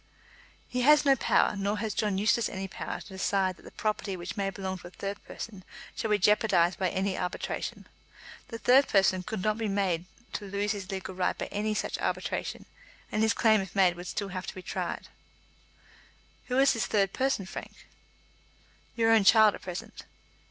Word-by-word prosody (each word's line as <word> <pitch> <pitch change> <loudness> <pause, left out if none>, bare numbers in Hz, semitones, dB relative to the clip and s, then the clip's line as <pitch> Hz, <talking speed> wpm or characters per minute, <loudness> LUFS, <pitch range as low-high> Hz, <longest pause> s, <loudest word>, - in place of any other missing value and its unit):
"He 250 - -2
has 295 +3 +6
no 275 -1 +6
power, 230 - +2
nor 200 +1 -1
has 215 0 -2
John 205 -3 0
Eustace 220 +3 +2
any 190 0 -4
power, - - -6
to - - -11
decide 190 -1 0
that - - -17
the - - -12
property 210 -3 -2
which 175 +1 -6
may 200 -2 -1
belong 190 -1 -5
to 175 - -10
a - - -10
third 195 +2 -6
person 200 -5 -8 0.3
shall 220 - -2
be 210 - +4
jeopardised 190 -3 +3
by 185 -1 +1
any 190 0 -1
arbitration. 180 0 -4 0.6
The 230 - -6
third 260 +4 +5
person 190 -2 +3
could 190 +1 -5
not 215 +1 +1
be 225 - -1
made 190 -4 0 0.3
to 205 - -4
lose 200 +1 -1
his 200 -3 -5
legal 190 -1 -5
right 180 0 0
by - - -3
any 215 +1 -1
such - - -2
arbitration, - - -3 0.5
and 215 - 0
his 220 +1 +3
claim, 220 -3 +4
if 195 - -8
made, 185 -3 +4
would 175 +1 -8
still 200 -1 -3
have 185 0 -5
to - - -6
be 185 - -8
tried." - - -4 1.4
"Who 250 - -1
is 270 0 +5
the 230 - -4
third 195 -1 +1
person, 265 -7 0
Frank?" - - -9 1.1
"Your 225 -1 +3
own 225 -2 +6
child 215 +1 +7
at - - -9
present." 180 -1 -7
200 Hz, 195 wpm, -29 LUFS, 190-220 Hz, 1.4 s, child